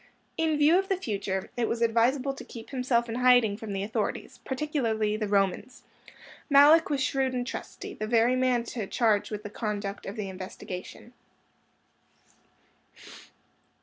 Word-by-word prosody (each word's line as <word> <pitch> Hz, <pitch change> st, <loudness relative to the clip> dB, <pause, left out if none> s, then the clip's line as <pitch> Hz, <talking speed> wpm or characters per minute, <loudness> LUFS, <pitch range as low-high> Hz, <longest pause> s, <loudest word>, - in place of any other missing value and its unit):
In 320 Hz, -2 st, +1 dB
view 305 Hz, +5 st, +5 dB
of 385 Hz, -, -4 dB
the 385 Hz, -, +1 dB
future, 200 Hz, -, -3 dB
it 240 Hz, -2 st, 0 dB
was 230 Hz, -, -2 dB
advisable 250 Hz, +4 st, +2 dB
to 270 Hz, -, -9 dB
keep 230 Hz, -3 st, -11 dB
himself 250 Hz, -3 st, +1 dB
in 225 Hz, -, -5 dB
hiding 245 Hz, -3 st, +4 dB
from 220 Hz, 0 st, -7 dB
the 195 Hz, 0 st, -2 dB
authorities, 210 Hz, -, -3 dB
particularly 240 Hz, -7 st, -1 dB
the 215 Hz, -1 st, -2 dB
Romans. 200 Hz, +4 st, 0 dB, 0.7 s
Malluch 295 Hz, +3 st, +7 dB
was 280 Hz, -3 st, 0 dB
shrewd 265 Hz, -1 st, 0 dB
and 245 Hz, -1 st, -2 dB
trusty; -, -, -7 dB
the 215 Hz, -, -5 dB
very 235 Hz, +2 st, +3 dB
man 255 Hz, -2 st, +2 dB
to 230 Hz, -3 st, -5 dB
charge 220 Hz, -3 st, +1 dB
with 210 Hz, -1 st, -5 dB
the 205 Hz, -, -6 dB
conduct 205 Hz, -3 st, -4 dB
of 195 Hz, -, -5 dB
the 210 Hz, -3 st, -4 dB
investigation. 185 Hz, +4 st, -8 dB
235 Hz, 150 wpm, -28 LUFS, 210-265 Hz, 0.7 s, Malluch